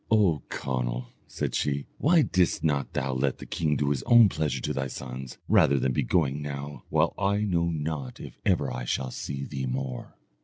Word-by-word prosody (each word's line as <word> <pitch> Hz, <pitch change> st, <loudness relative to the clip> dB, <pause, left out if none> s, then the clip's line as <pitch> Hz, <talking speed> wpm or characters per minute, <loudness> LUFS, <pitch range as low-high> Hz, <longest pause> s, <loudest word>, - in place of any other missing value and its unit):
"O 100 Hz, -, +4 dB
Conall," 60 Hz, -1 st, -3 dB, 0.2 s
said -, -, -3 dB
she, 70 Hz, -1 st, 0 dB
"why 160 Hz, +1 st, +5 dB
didst 90 Hz, -7 st, +1 dB
not 70 Hz, -4 st, 0 dB
thou 65 Hz, 0 st, -1 dB
let 65 Hz, +1 st, 0 dB
the -, -, -9 dB
king 75 Hz, -3 st, 0 dB
do 70 Hz, 0 st, +1 dB
his 70 Hz, -, 0 dB
own 120 Hz, -3 st, +8 dB
pleasure 75 Hz, -4 st, -1 dB
to -, -, -2 dB
thy 65 Hz, -1 st, -1 dB
sons, 65 Hz, 0 st, -7 dB
rather 70 Hz, -, +5 dB
than 65 Hz, 0 st, +1 dB
be -, -, +1 dB
going 75 Hz, -5 st, +1 dB
now, 70 Hz, 0 st, -6 dB
while -, -, +2 dB
I 100 Hz, +1 st, +2 dB
know 85 Hz, -4 st, +1 dB
not 75 Hz, -4 st, -3 dB
if -, -, -9 dB
ever -, -, +1 dB
I 60 Hz, -, -4 dB
shall 65 Hz, +1 st, -2 dB
see 70 Hz, +2 st, -4 dB
thee 65 Hz, -2 st, -4 dB
more?" 65 Hz, -1 st, -4 dB
70 Hz, 195 wpm, -27 LUFS, 65-80 Hz, 0.2 s, own